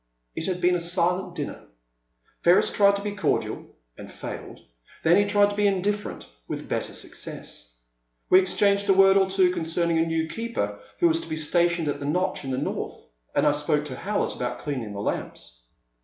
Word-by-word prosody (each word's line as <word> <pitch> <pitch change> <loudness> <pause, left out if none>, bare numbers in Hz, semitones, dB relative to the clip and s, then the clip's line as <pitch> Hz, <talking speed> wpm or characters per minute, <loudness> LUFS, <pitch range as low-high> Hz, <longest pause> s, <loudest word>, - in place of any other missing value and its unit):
It 160 - -3
had 180 -1 -1
been 180 +1 +4
a 180 - +1
silent 180 +2 0
dinner. - - -5 0.8
Ferris 175 +2 +4
tried 200 -1 +4
to 200 - -4
be 205 - -2
cordial, 200 -7 -1 0.3
and - - -11
failed. - - -8 0.4
Then 165 +2 +5
he 205 +1 +4
tried 205 0 +3
to - - -5
be 205 0 +1
indiffer 205 +1 0
ent, - - -12 0.2
with - - -5
better - - -2
success. - - -8 0.5
We 185 - +7
exchanged 200 +2 +2
a - - +7
word 195 0 +6
or 190 -1 +4
two 190 -2 +3
concerning 165 -1 0
a 165 - +3
new 165 0 0
keeper 230 +8 -3 0.2
who 345 - +4
was 330 0 +1
to - - -10
be 155 - -2
stationed 170 +1 +1
at 145 - -2
the 140 - -4
notch 180 +4 -1
in 135 - -5
the 130 - -1
north, - - -3 0.4
and - - +3
I 150 - +5
spoke 150 0 0
to 135 -4 -6
Howlett 205 +10 -2
about 125 -1 -3
cleaning 125 -8 -4
the 100 - -5
lamps. - - -5
180 Hz, 200 wpm, -25 LUFS, 155-200 Hz, 0.8 s, We